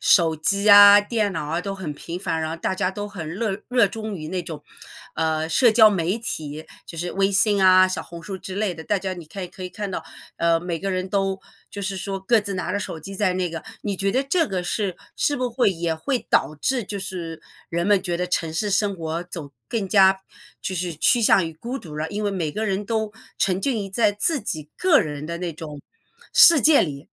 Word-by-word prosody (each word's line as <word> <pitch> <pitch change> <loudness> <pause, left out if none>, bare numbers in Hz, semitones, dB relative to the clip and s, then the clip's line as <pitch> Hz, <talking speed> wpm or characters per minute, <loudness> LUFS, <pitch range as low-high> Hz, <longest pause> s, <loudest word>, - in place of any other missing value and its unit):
手 165 -4 +4
机 200 +7 +1
啊， 205 0 +10
电 205 -1 -1
脑 155 -3 -4
啊 165 +3 -2
都 195 +1 -5
很 180 -6 -6
频 170 +4 -7
繁， 165 -4 -2
然 160 - -2
后 165 - -4
大 190 - -2
家 185 -1 -1
都 205 +1 -5
很 165 -5 -7
乐 210 -2 -2
热 245 -4 +4
衷 220 -2 -6
于 155 -1 -7
那 185 -1 -3
种， 160 -4 -8 0.5
呃， 160 0 -1
社 235 +8 +4
交 220 -1 +7
媒 185 +3 -1
体， 155 -8 -5 0.2
就 165 - -10
是 175 +1 -3
微 195 0 +1
信 200 0 +3
啊、 185 0 +7
小 185 - -3
红 170 -1 -10
书 190 +2 -6
之 185 +1 -8
类 205 -4 -1
的。 160 - -9
大 205 +3 0
家 190 0 -4
你 175 -3 -10
看 180 +4 -7
可 185 - -11
以 180 - -4
看 205 +1 -6
到， 165 - -4 0.4
呃， 170 0 +2
每 170 -2 -4
个 195 0 -2
人 185 0 -2
都 195 0 -1 0.3
就 200 - -7
是 195 -1 -3
说 195 +1 -4
各 220 +3 +3
自 200 -1 -3
拿 180 - -3
着 205 - 0
手 165 - -5
机 195 +6 -9
在 190 -2 +1
那 180 -1 -1
个 165 0 -6 0.2
你 200 -2 -3
觉 195 +1 0
得 260 - +1
这 330 +4 +2
个 185 -2 -2
是 190 0 -2 0.2
是 290 - +1
不 250 -2 -1
会 235 -3 +2
也 165 -2 -2
会 245 - -2
导 155 - +2
致 260 -3 0
就 200 - -5
是 175 -4 -5 0.3
人 170 +1 -2
们 200 -2 +3
觉 175 -3 -2
得 180 +1 -2
城 165 -3 -1
市 205 +6 -1
生 200 +1 +1
活 165 0 -4
走 165 -5 -8 0.2
更 210 -5 -2
加 190 -1 +5 0.4
就 185 - -4
是 180 0 -2
趋 235 +8 +3
向 190 -5 +4
于 165 - -8
孤 240 +10 -6
独 155 - -11
了？ 155 +1 -3
因 210 +1 -3
为 205 - 0
每 170 -5 -2
个 215 +8 -3
人 195 +1 -2
都 220 -1 -2 0.3
沉 190 0 +1
浸 265 -1 0
于 - - -7
在 210 +2 +2
自 260 +8 +2
己 155 -7 -4
个 365 -5 +4
人 150 -2 -5
的 170 +1 -5
那 175 -2 -4
种 150 -2 -9 0.5
世 330 -5 +8
界 305 +1 +6
里。 145 -2 -6
190 Hz, 260 characters per minute, -23 LUFS, 165-205 Hz, 0.5 s, 啊